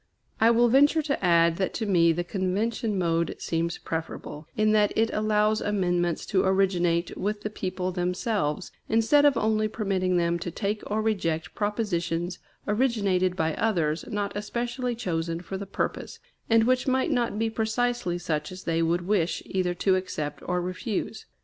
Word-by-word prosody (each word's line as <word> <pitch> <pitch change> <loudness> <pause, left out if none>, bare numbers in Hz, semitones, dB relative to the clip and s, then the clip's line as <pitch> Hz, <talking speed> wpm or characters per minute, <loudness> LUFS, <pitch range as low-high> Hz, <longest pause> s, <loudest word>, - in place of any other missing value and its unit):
I 225 - +5
will 235 +1 +5
venture 290 +6 +4
to 280 -7 -2
add 170 -1 +4
that 190 - -1
to 225 - -2
me 170 -4 +4
the 175 +2 -1
convention 205 +4 -1
mode 170 -2 0
seems 165 0 -2
preferable, 160 -2 -6
in 215 0 +3
that 210 -1 +3
it 225 +1 +2
allows 215 0 +2
amendments 175 -4 0
to 190 -1 +3
originate 180 -3 +1
with 205 +1 -3
the 215 - -3
people 185 -2 -3
themselves, 180 -2 -1 0.2
instead 230 +7 +4
of 285 -4 +4
only 215 -1 +1
permitting 190 -4 0
them 170 0 +1
to 175 - -4
take 205 +4 -2
or 215 +1 0
reject 175 -6 -1
propositions 180 -5 -2 0.3
originated 200 -6 +1
by 160 -3 0
others 170 -8 0
not 205 -3 -3
especially 240 +4 -2
chosen 165 -6 -2
for 180 +2 -7
the 195 +1 -5
purpose, 195 - -3 0.3
and 225 0 +5
which 255 +2 +2
might 260 +4 +1
not 240 -5 0
be 225 0 0
precisely 220 -4 -1
such 155 -3 -3
as 185 +1 -9
they 165 0 0
would 170 +2 +1
wish 185 -4 0
either 180 -2 -1
to 190 +1 +2
accept 155 -6 -3
or 180 0 0
refuse. 210 +4 -4
195 Hz, 165 wpm, -26 LUFS, 175-220 Hz, 0.3 s, I